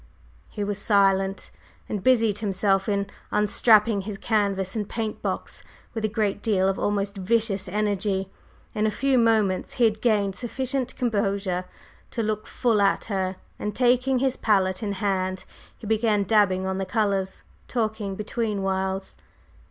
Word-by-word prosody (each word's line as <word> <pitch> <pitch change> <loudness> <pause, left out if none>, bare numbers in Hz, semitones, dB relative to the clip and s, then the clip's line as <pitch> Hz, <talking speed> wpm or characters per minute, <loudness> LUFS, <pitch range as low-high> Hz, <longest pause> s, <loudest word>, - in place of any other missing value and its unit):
He 210 - -4
was 205 0 -2
silent, 195 -2 +2 0.4
and 205 -3 -4
busied 225 -5 +3
himself 195 -1 +1
in 200 -1 +1 0.2
unstrapping 210 0 +4
his 200 +1 -6
canvas 200 -3 0
and 210 -2 -3
paint 220 -2 -3
box - - -4 0.3
with 225 - -4
a - - +3
great 205 -1 -1
deal 195 -4 +2
of 195 - 0
almost 200 0 -1
vicious 195 -1 0
energy. 200 -1 -1 0.4
In 215 -1 +1
a - - +3
few 265 +3 +1
moments 220 -5 +2
he 250 - 0
had 220 -2 +2
gained 205 -4 +2
sufficient 255 +3 -3
composure 200 -5 0 0.4
to 230 - -2
look 215 0 -2
full 230 -5 +1
at 195 0 +2
her, 190 -1 -1 0.2
and 210 -1 -3
taking 255 +1 +3
his 260 0 0
palette 190 -3 +1
in 205 -2 -2
hand, 185 -1 -1 0.3
he - - -11
began 215 -1 +2
dabbing 190 -2 +3
on 190 0 -2
the 195 - -1
colors, 195 -3 -1 0.2
talking 215 -4 -2
between 210 -1 -2
whiles. 190 0 -2
205 Hz, 150 wpm, -25 LUFS, 195-220 Hz, 0.4 s, unstrapping